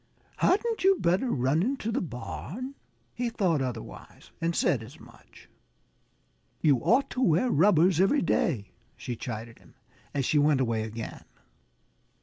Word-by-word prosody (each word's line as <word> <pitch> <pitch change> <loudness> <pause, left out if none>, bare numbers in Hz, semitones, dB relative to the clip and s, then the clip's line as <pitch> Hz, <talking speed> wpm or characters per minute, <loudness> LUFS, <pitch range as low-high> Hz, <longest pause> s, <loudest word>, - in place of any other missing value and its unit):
"Hadn't 450 +4 +1
you 385 +1 +6
better 190 - +1
run 135 - +1
into 235 0 -1
the - - -1
barn?" 125 - -6 0.4
He 245 0 -2
thought 180 -10 +1
otherwise 125 -4 -7
and 165 0 0
said 125 - +2
as 130 +8 -12
much. - - -17 1.1
"You 145 -4 +4
ought 250 - +2
to 255 - -3
wear 185 +4 +3
rubbers 175 0 +4
every 195 +10 +3
day," 105 - 0 0.3
she 120 - -5
chided 115 0 -7
him, - - -21 0.4
as 140 -2 -1
she 150 - +2
went 145 -1 +3
away 115 -4 0
again. 110 0 -7
155 Hz, 140 wpm, -28 LUFS, -, 1.1 s, you